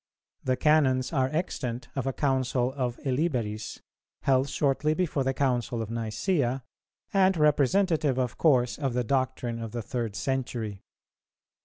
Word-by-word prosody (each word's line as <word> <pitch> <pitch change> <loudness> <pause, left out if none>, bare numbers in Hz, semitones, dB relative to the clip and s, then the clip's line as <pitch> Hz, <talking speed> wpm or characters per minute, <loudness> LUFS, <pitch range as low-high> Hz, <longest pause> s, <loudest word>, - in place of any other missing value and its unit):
The 130 -1 +1
Canons 135 -2 +3
are 130 -3 +2
extant 125 -7 -3
of 135 -1 -2
a - - +2
Council 130 -2 0
of 125 -3 -2
Illiberis, 125 -7 -1 0.4
held 135 +1 +3
shortly 145 +2 +1
before 160 -6 0
the 135 - +1
Council 125 -3 0
of 110 -2 -3
Nicæa, 120 - -1 0.5
and 190 -2 +4
representative 150 0 +3
of 125 -2 -1
course 130 -6 +3
of 135 -4 -1
the 125 - +1
doctrine 130 -2 -1
of 115 -1 -6
the 120 -2 -3
third 115 -3 -3
century. 120 -7 -3
130 Hz, 140 wpm, -28 LUFS, 120-145 Hz, 0.5 s, and